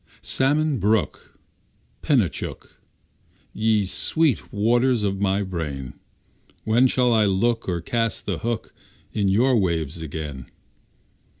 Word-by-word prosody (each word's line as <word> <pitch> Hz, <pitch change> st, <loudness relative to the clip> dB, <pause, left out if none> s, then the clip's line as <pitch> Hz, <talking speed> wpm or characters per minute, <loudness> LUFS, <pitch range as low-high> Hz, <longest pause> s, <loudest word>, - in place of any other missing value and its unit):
Salmon 145 Hz, +1 st, +1 dB
Brook, 105 Hz, 0 st, -1 dB, 0.7 s
Penichook, -, -, -1 dB, 0.7 s
Ye 110 Hz, -1 st, +1 dB
sweet 150 Hz, -, 0 dB
waters 120 Hz, +2 st, +2 dB
of 100 Hz, -1 st, -1 dB
my 100 Hz, 0 st, +1 dB
brain, 75 Hz, -9 st, -5 dB, 0.7 s
When 115 Hz, +4 st, +4 dB
shall 125 Hz, -1 st, +2 dB
I 110 Hz, -2 st, +4 dB
look, 100 Hz, +3 st, 0 dB
Or 85 Hz, -2 st, -2 dB
cast 115 Hz, +4 st, -1 dB
the 95 Hz, -5 st, -2 dB
hook, 115 Hz, -1 st, -4 dB, 0.4 s
In 100 Hz, -2 st, 0 dB
your 120 Hz, +7 st, +3 dB
waves 85 Hz, -6 st, -1 dB
again? 75 Hz, -3 st, -6 dB
105 Hz, 110 wpm, -23 LUFS, 90-120 Hz, 0.7 s, When